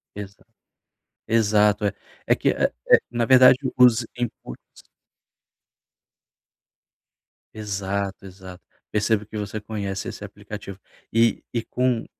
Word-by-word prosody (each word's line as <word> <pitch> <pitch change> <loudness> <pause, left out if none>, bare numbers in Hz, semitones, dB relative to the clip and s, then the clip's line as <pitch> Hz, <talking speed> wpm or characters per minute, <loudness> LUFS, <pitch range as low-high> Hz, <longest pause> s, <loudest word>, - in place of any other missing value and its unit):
Exa 100 -1 -10 0.8
Exato. 105 -2 +2
É 100 - +1 0.4
é - - +4
que, - - 0
eh - - +1 0.2
eh, - - +9
na 120 0 -1
verdade 130 0 +7 0.2
os 125 -2 +5
inputs 120 - -7 2.8
Exato, 100 -1 -4
exato. 95 -1 -12 0.3
Percebo 105 0 0
que 105 +1 -8
você 105 +1 -5
conhece 100 -3 -5
esse - - -8
aplicativo. 100 -1 -9 0.4
E 115 +1 +3
e 115 - -1
com 125 -2 -1
105 Hz, 110 wpm, -23 LUFS, 100-115 Hz, 2.8 s, eh